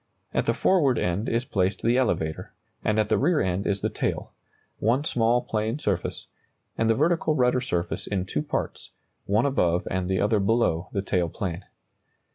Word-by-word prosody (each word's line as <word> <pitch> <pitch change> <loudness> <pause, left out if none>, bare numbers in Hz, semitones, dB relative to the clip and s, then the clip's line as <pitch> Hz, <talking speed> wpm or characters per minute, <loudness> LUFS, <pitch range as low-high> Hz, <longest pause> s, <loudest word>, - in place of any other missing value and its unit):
At - - 0
the - - +2
forward 145 -10 +3
end 90 +6 -1
is 115 +2 0
placed 95 -4 -1
the 120 +1 +3
elevator, 90 -11 -1 0.3
and 110 0 +1
at 105 - +2
the - - +2
rear 155 +3 +2
end 95 +1 -1
is 100 -1 0
the - - 0
tail - - -3 0.5
one 120 +6 +2
small 120 -4 +2
plane 110 +3 -2
surface 100 - -2 0.5
and 115 - +1
the 115 - +4
vertical 160 +2 +2
rudder 125 -1 +2
surface 90 -8 -2
in 95 -3 -1
two 75 -5 -2
parts, - - -4 0.4
one 105 +5 +2
above 90 -11 +1
and 95 0 -1
the 95 - +1
other 105 +1 +2
below 100 -5 +1
the 100 -2 -2
tail 90 -4 0
plane. 90 -1 -5
105 Hz, 180 wpm, -25 LUFS, 95-125 Hz, 0.5 s, the